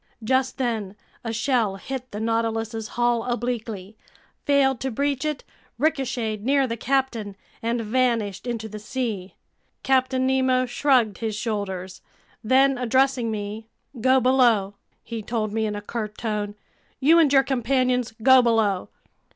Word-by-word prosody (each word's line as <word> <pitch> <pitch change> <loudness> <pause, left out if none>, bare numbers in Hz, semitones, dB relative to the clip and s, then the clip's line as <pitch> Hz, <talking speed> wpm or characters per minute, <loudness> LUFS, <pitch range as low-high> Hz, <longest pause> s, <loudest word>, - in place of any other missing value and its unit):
Just 260 +3 +1
then 225 -7 -2 0.3
a 230 - -3
shell 230 -3 +1
hit 255 +5 -6
the 210 - -6
Nautilus's 225 0 -1
hull 240 -1 +2
obliquely, 225 -4 -4 0.5
failed 270 -3 +3
to 265 - -2
breach 280 +3 -1
it, 300 -3 -2 0.3
ricocheted 240 -7 -1
near 275 +2 +3
the 230 -2 -3
captain, 235 -5 -1 0.3
and 235 +1 -1
vanished 230 -2 0
into 230 -2 -3
the 215 0 -8
sea. 215 -4 -4 0.5
Captain 260 0 +2
Nemo 260 -1 +2
shrugged 245 -5 +2
his 220 -2 -2
shoulders. 200 -4 -4 0.4
Then, 265 +3 +3
addressing 260 0 +2
me: 215 +1 -5 0.3
"Go 260 +2 +5
below!" 240 -6 +3 0.3
he 230 -1 -5
told 215 -1 -2
me 220 0 0
in 210 - -3
a 205 - -5
curt 210 -1 -5
tone. 210 -3 -3 0.4
"You 315 +5 +5
and 305 -4 +4
your 270 -1 +6
companions, 255 -2 0
go 260 -1 +8
below!" 220 -5 +1
235 Hz, 140 wpm, -24 LUFS, 215-260 Hz, 0.5 s, go